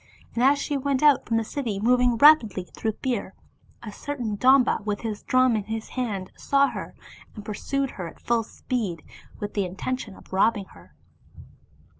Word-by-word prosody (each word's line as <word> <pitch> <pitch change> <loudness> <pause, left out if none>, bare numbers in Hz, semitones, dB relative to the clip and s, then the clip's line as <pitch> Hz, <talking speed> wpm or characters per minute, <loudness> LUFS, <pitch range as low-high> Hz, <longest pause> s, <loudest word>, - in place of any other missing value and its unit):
And 235 - -1
as 280 +2 +5
she 285 0 -2
went 275 0 -1
out 295 -3 +5
from 225 - +1
the 225 - +1
city 225 -4 -3
moving 245 +2 +3
rapidly 230 -9 +6
through 220 +4 -4
fear, 235 -7 -2 0.5
a 215 - -7
certain 245 -3 -4
Domba 255 0 +4
with 205 -1 -3
his 220 -3 -4
drum 255 -2 +3
in 210 -2 -2
his 220 0 -5
hand, 210 -7 -3
saw 280 0 +2
her, - - -7 0.4
and 210 -2 -9
pursued 275 +5 -2
her 180 -3 -6
at - - -12
full 235 -1 +1
speed 210 -7 -4 0.4
with 205 0 -5
the 200 - 0
intention 200 +4 -4
of - - -16
robbing 200 +1 +2
her. 90 0 -18
230 Hz, 175 wpm, -25 LUFS, 205-255 Hz, 0.5 s, rapidly